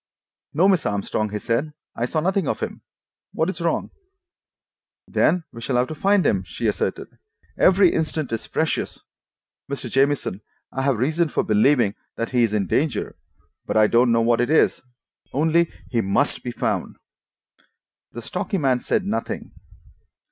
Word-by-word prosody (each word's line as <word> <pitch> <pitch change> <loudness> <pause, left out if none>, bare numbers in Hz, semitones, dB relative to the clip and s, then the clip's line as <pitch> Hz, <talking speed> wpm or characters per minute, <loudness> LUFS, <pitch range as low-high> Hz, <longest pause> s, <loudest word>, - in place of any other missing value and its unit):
"No, 175 +5 +5
Miss 185 -6 +2
Armstrong," 105 +1 -1
he 105 - -3
said. 125 +8 -1 0.2
"I 120 - -1
saw 155 +4 -1
nothing 190 -1 0
of - - -1
him. - - -5 0.5
What 165 +4 0
is 190 - -10
wrong?" 165 -1 -1 1.2
"Then 180 -1 +2
we 115 - -9
shall 125 +2 -2
have 125 +1 +2
to - - -4
find 195 +5 +2
him," 95 -2 +2
she 95 +6 -6
asserted. 105 - -2 0.4
"Every 190 -1 +5
instant 155 -4 -2
is 115 - -3
precious. - - -2 0.7
Mr. 125 -4 -5
Jamieson, 135 -7 +1 0.3
I 135 - -3
have 135 -3 +1
reason 155 +7 +1
for - - 0
believing 110 0 +3 0.2
that 115 - -3
he 125 -2 +2
is 115 -3 +3
in 100 -2 +1
danger, 145 - -1 0.5
but - - 0
I 110 - +6
don't 120 +2 +4
know 115 0 +3
what 115 +1 +3
it 125 - 0
is. 160 - +3 0.5
Only—he 160 -5 +1
must 100 +9 0
be 125 - -3
found." 120 - -2 1.2
The 120 - -8
stocky 185 - -2
man 135 -6 +2
had - - -21
said 200 - +1
nothing. 205 +3 -3
135 Hz, 160 wpm, -23 LUFS, 115-160 Hz, 1.2 s, I